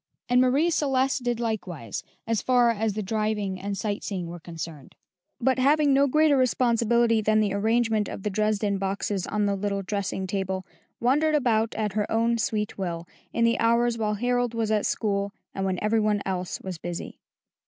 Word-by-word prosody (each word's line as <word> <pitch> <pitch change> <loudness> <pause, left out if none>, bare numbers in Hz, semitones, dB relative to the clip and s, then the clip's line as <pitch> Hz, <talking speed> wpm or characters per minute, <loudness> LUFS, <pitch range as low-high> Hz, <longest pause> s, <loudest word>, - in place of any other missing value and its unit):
And 245 +1 +4
Marie 275 +7 +3
Celeste 270 -3 +1
did 240 -1 -1
likewise, 185 - -4 0.2
as 225 -1 0
far 245 -2 +4
as 220 -1 -1
the 215 +1 -3
driving 210 -2 -1
and 200 0 -3
sight 205 -1 -3
seeing 185 -4 -3
were 170 +1 -7
concerned; 160 -4 -8 0.4
but 260 +1 +2
having 290 +2 +4
no 280 +1 +4
greater 305 +1 +4
responsibility 235 -3 +2
than 215 +1 +3
the 205 -2 +1
arrangement 220 0 +1
of 195 - -7
the 210 - -1
Dresden 210 -1 0
boxes 195 0 -2
on 210 -1 0
the 200 0 +1
little 200 0 -2
dressing 195 -1 -2
table, 190 -1 -3 0.3
wandered 300 +6 +2
about 225 -5 +1
at 210 -2 -1
her 210 0 -1
own 230 +1 +2
sweet 210 -2 -2
will, 170 -3 -3 0.2
in 230 - 0
the 230 - +2
hours 235 +1 +3
while 215 -2 -1
Harold 245 +1 0
was 225 -1 0
at 215 -1 +2
school 200 -2 -1 0.2
and 195 - -2
when 185 -1 -1
every 220 +1 +2
one 210 -1 +1
else 185 -2 -3
was 185 -4 -6
busy. 175 +1 -6
215 Hz, 185 wpm, -26 LUFS, 195-240 Hz, 0.4 s, And